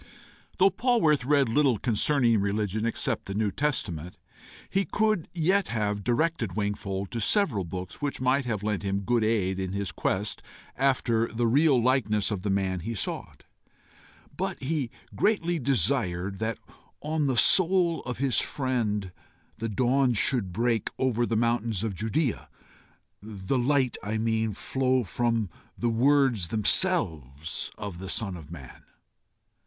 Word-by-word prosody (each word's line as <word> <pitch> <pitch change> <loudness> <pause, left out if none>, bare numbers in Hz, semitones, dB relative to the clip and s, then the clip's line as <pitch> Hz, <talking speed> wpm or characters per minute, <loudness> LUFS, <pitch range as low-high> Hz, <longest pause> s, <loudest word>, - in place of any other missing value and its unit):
Though 195 +1 +5
Polwarth 180 - +2
read 140 -1 +3
little 130 0 +3
concerning 120 +1 +2
religion 105 +2 -1
except 115 0 -2
the 95 - -5
New 105 -1 +1
Testament, 90 - -2 0.5
he 195 +1 +1
could 215 -4 0
yet 185 +4 +1
have 105 -3 -2
directed 120 - 0
Wingfold 100 -2 -3
to 115 - -3
several 130 - +2
books 90 - -7
which 145 -1 -2
might 130 +2 +2
have 110 -4 -2
lent 105 -1 -1
him 100 -1 -1
good 115 +3 +1
aid 100 -4 +1
in 95 0 -3
his 100 -1 -2
quest 100 +2 -2 0.3
after 125 -4 +1
the 115 +1 -1
real 140 +3 +4
likeness 115 -4 +1
of 100 -3 -2
the 105 - -2
man 95 -2 0
he 115 +7 -4
sought; - - -5 0.9
but - - -3
he 135 -2 -2 0.2
greatly 175 -6 +1
desired 100 - 0
that 110 0 -2 0.4
on 150 -1 0
the 130 -3 0
soul 175 - +3
of 125 - -5
his 130 -3 +1
friend 110 -8 -1 0.5
the 115 0 -2
dawn 125 +4 +2
should 110 -3 +2
break 115 +2 0
over 120 -2 +1
the 115 - 0
mountains 115 -3 0
of 110 -3 -2
Judæa 115 - -1 0.7
the 105 +4 -3
light, 130 0 +2
I 105 +2 -2
mean, 110 -1 0
flow 130 +2 0
from 115 0 -1 0.3
the 120 - 0
words 130 -5 +3
themselves 80 - 0
of 100 -4 -6
the 95 0 -6
Son 100 -4 -2
of 80 -4 -11
Man. 70 -7 -11
115 Hz, 145 wpm, -27 LUFS, 100-135 Hz, 0.9 s, Though